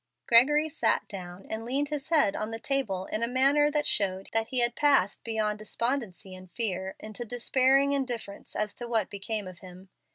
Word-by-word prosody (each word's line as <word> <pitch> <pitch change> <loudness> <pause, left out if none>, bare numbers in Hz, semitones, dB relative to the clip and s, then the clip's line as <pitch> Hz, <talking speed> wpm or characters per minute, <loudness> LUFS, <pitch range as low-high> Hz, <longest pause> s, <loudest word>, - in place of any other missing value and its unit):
Gregory 295 +6 +6
sat 305 - 0
down 180 -2 -8
and 220 +1 -4
leaned 275 +5 -1
his 295 0 -4
head 300 -12 +3
on 215 - -3
the 225 - -4
table 225 -8 -2
in 215 - -3
a 235 - +1
manner 275 +4 +3
that 300 0 0
showed 190 -2 +1 0.2
he 260 - -3
had 240 -1 +2
passed 275 -10 +2
beyond 215 -2 -1
despondency 215 -4 -3
and 185 0 -12
fear 190 -5 -2
into 215 +2 -7
despairing 260 +4 +2
indifference 245 -7 -4
as 210 -1 -2
to 240 - -6
what 225 -4 0
became 205 0 -4
of 180 -2 -10
him. 185 0 -13
230 Hz, 185 wpm, -28 LUFS, 195-270 Hz, 0.2 s, Gregory